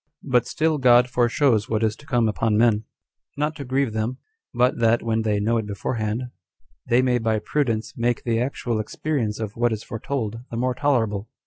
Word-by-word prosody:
But 125 Hz, -3 st, +2 dB
still 155 Hz, -1 st, 0 dB
God 125 Hz, -1 st, +6 dB
foreshows 120 Hz, -2 st, +2 dB
what 110 Hz, 0 st, 0 dB
is 110 Hz, -1 st, +1 dB
to 140 Hz, -, -17 dB
come 120 Hz, -4 st, +2 dB
upon 110 Hz, 0 st, +1 dB
men, 110 Hz, -2 st, +3 dB, 0.5 s
not 150 Hz, +2 st, -1 dB
to 140 Hz, -, -5 dB
grieve 130 Hz, -2 st, 0 dB
them, 110 Hz, +4 st, -2 dB, 0.3 s
but 125 Hz, 0 st, +1 dB
that, 115 Hz, 0 st, +3 dB
when 115 Hz, -1 st, 0 dB
they 105 Hz, -2 st, 0 dB
know 115 Hz, +3 st, +1 dB
it 110 Hz, -2 st, -2 dB
beforehand, 110 Hz, +4 st, -3 dB, 0.6 s
they 125 Hz, +1 st, +4 dB
may 125 Hz, -1 st, +2 dB
by 110 Hz, -1 st, +1 dB
prudence 115 Hz, -1 st, -1 dB
make 120 Hz, -1 st, 0 dB
the 115 Hz, -1 st, 0 dB
actual 120 Hz, -3 st, -2 dB
experience 115 Hz, -1 st, -2 dB
of 110 Hz, -1 st, -4 dB
what 120 Hz, 0 st, +1 dB
is 110 Hz, -1 st, -3 dB
foretold 115 Hz, -2 st, -4 dB
the 115 Hz, -, -5 dB
more 125 Hz, +1 st, 0 dB
tolerable. 115 Hz, -7 st, 0 dB
115 Hz, 190 wpm, -23 LUFS, 110-125 Hz, 0.6 s, God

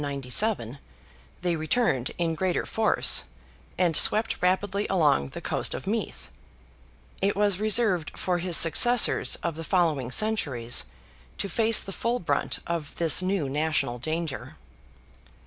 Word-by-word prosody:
797) 140 Hz, -, -1 dB, 0.6 s
they 175 Hz, -1 st, 0 dB
returned 155 Hz, -, -1 dB
in 170 Hz, -1 st, -1 dB
greater 180 Hz, +2 st, -2 dB
force, 220 Hz, -1 st, +2 dB, 0.5 s
and 175 Hz, -3 st, +1 dB
swept 215 Hz, +2 st, +3 dB
rapidly 195 Hz, +3 st, 0 dB
along 150 Hz, -, +1 dB
the -, -, -9 dB
coast -, -, -2 dB
of -, -, -8 dB
Meath; -, -, -4 dB, 0.9 s
it 195 Hz, +1 st, +1 dB
was 200 Hz, -2 st, +1 dB
reserved 215 Hz, -6 st, +1 dB
for 180 Hz, -1 st, -2 dB
his 175 Hz, -1 st, -1 dB
successors 240 Hz, +8 st, +4 dB
of 170 Hz, -2 st, -3 dB
the 165 Hz, -, -7 dB
following 160 Hz, -8 st, 0 dB
centuries 130 Hz, -, -1 dB, 0.5 s
to -, -, -3 dB
face 225 Hz, +3 st, +3 dB
the 195 Hz, -, -8 dB
full 235 Hz, +5 st, -2 dB
brunt 175 Hz, -, -2 dB
of 165 Hz, -4 st, -5 dB
this 165 Hz, 0 st, +5 dB
new 185 Hz, -5 st, -2 dB
national 145 Hz, -3 st, -2 dB
danger. 160 Hz, +1 st, -5 dB
170 Hz, 130 wpm, -25 LUFS, 150-200 Hz, 0.9 s, this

